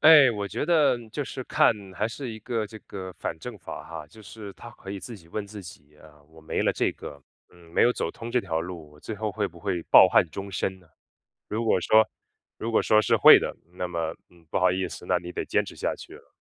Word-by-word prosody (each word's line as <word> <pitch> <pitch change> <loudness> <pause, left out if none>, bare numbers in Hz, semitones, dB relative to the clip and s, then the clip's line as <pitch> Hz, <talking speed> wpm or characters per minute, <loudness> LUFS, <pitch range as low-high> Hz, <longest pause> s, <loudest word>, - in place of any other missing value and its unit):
哎， 150 -5 +9
我 105 -3 -3
觉 100 - -3
得 155 -7 +4
就 145 +6 -3
是 130 0 -6
看 - - +4 0.2
还 105 +4 0
是 125 +3 -6
一 110 - -7
个 115 -1 -2
这 110 +1 -11
个 95 -2 -8
反 - - -3
证 120 +4 -7
法 85 -5 -8
哈。 80 -1 -8
就 95 +9 -16
是 105 -1 -9
他 120 - -11
可 95 - -10
以 100 -1 -5
自 115 +5 -8
己 85 -4 -18
问 105 +3 -4
自 105 0 -9
己 75 -3 -13
啊， 75 -1 -18
我 80 0 -17
没 80 - -2
了 - - +3
这 - - 0
个 70 -1 -10 0.3
嗯， 85 -1 -19
没 - - +4
有 120 - +6
走 80 - -2
通 115 +5 -8
这 125 - +2
条 80 -6 -2
路， 85 -3 -7
我 75 - -18
最 110 - -5
后 105 0 -2
会 105 -1 -1
不 85 -1 -15
会 85 +1 -2
抱 - - +8
憾 90 -1 +4
终 100 +5 -6
身 95 0 -2
呢？ 90 - -22 0.6
如 110 +2 -2
果 110 - +3
说 110 +5 +5 0.5
如 115 - -4
果 110 - +3
说 110 0 +4
是 - - +3
会 - - +10
的， - - -4 0.2
那 90 0 -3
么， 85 -2 -2 0.2
嗯， 85 -2 -22
不 - - 0
好 90 -1 +4
意 95 +1 -1
思， - - -9
那 90 - +2
你 90 0 -8
得 - - -3
坚 - - +1
持 - - -10
下 - - -1
去 - - -12
了。 - - -17
95 Hz, 275 characters per minute, -26 LUFS, 85-110 Hz, 0.6 s, 会